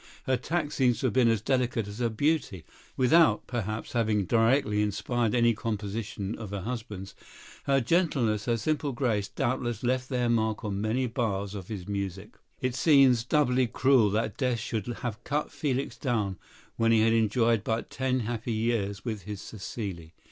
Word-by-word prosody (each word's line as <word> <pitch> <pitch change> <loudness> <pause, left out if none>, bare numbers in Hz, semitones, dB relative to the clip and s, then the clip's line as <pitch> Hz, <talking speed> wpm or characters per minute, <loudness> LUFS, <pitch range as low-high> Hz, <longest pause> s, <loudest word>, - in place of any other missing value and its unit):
Her 130 - +1
tact 150 +4 -2
seems 125 -4 +2
to - - -1
have 120 - +1
been 125 -2 +4
as 115 -3 +1
delicate 125 -5 0
as 105 +3 -8
her 120 -1 +1
beauty. 115 - -1 0.3
Without, 135 -2 +4
perhaps, 110 -3 -4
having 110 -4 +1
directly 115 0 +2
inspired 115 +3 0
any 120 -1 +4
composition 105 -1 -4
of 110 -4 -6
her 100 -1 -4
husband's, 105 -3 -6 0.5
her 135 -1 +3
gentleness, 125 - +1
her 120 -1 +1
simple 150 +3 -1
grace, 115 -5 0
doubtless 120 -2 -2
left 130 +1 0
their 125 -3 0
mark 110 -2 0
on 100 -1 -2
many 115 +5 0
bars 105 -5 -2
of 95 -3 -7
his 100 -5 -6
music. 100 0 -4 0.3
It 130 -1 0
seems 135 -4 +5
doubly 130 -2 +2
cruel 125 -1 +4
that 105 0 -1
death 125 -2 +1
should 110 -2 -3
have 120 -2 -5
cut 150 +2 -2
Felix 135 -3 -2
down 105 -8 -1 0.4
when 115 0 +3
he 110 -1 +5
had 115 +1 +4
enjoyed 115 0 +2
but 110 +1 -2
ten 130 -1 0
happy 115 +1 -3
years 110 -3 -1
with 110 -4 -3
his 105 -1 -5
Cécile. 95 -6 -7
115 Hz, 170 wpm, -28 LUFS, 105-125 Hz, 0.5 s, seems